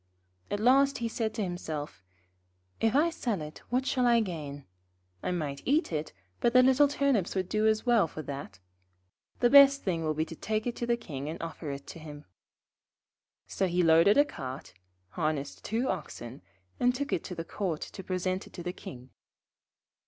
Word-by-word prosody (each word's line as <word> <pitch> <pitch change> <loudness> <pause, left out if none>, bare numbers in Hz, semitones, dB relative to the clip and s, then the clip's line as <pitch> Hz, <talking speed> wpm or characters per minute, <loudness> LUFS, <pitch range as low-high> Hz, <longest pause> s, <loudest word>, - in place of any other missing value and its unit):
At 205 - -2
last 275 +5 +4
he 235 - -2
said 225 -1 -2
to 220 - -1
himself: 155 - -5 0.8
'If 225 +2 +2
I 325 +4 +4
sell 235 - -2
it 150 0 -8
what 255 +2 +1
shall 255 -2 +2
I 235 -1 +5
gain? 150 -9 -5 0.6
I - - -2
might 150 -6 -3
eat 295 - +1
it, 155 0 -2 0.3
but 235 - +2
the 255 0 +7
little 265 +3 +5
Turnips 275 -10 +1
would 185 -1 0
do 215 +2 +1
as 215 +1 +1
well 235 -8 +4
for 155 0 -7
that. 140 -9 -7 0.8
The 240 - +5
best 280 0 +8
thing 170 -4 -1
will 155 -1 0
be 155 +1 0
to 165 - -9
take 215 +5 -2
it 245 - -2
to 235 - -3
the 235 0 +2
King 145 - -6
and 165 - -6
offer 165 -2 -6
it 140 0 -6
to - - -9
him.' 150 -2 -10 1.2
So 190 - -1
he 180 0 +1
loaded 165 +6 +6
a 290 - +6
cart, 135 - -7 0.4
harnessed 155 - -3
two 230 +4 -1
oxen, 135 - -5 0.4
and 245 0 +3
took 285 +3 -2
it - - 0
to 180 - -6
the 165 - -5
Court 175 -4 -3
to 190 - -7
present 185 0 -2
it - - -18
to 175 - -7
the 180 +1 -3
King. 125 -7 -10
185 Hz, 190 wpm, -29 LUFS, 155-240 Hz, 1.2 s, best